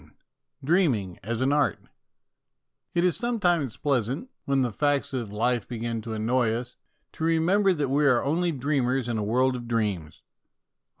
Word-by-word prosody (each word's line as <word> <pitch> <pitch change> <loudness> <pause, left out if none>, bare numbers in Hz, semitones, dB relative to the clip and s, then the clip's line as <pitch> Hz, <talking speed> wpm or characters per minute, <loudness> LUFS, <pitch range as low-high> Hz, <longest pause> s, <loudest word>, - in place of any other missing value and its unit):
IV - - -22 0.5
DREAMING 130 - +1
AS 115 +4 -3
AN 135 +2 +2
ART 145 -1 +2 1.2
IT 170 - +3
is 180 -1 +3
sometimes 175 - 0
pleasant, 140 - -1
when 135 -1 +2
the 120 - -1
facts 145 +4 0
of 120 -6 -3
life 115 +1 0
begin 115 -1 -3
to 110 0 -6
annoy 115 +2 +1
us, 120 +1 -5 0.4
to - - -7
remember 175 +5 +3
that 150 -6 -1
we 145 +2 +3
are 125 -3 +3
only 170 +4 +1
dreamers 135 -3 0
in 115 -2 -1
a - - -1
world 125 +5 +2
of 120 -1 -6
dreams. 105 -9 -2
130 Hz, 165 wpm, -26 LUFS, 115-150 Hz, 1.2 s, IT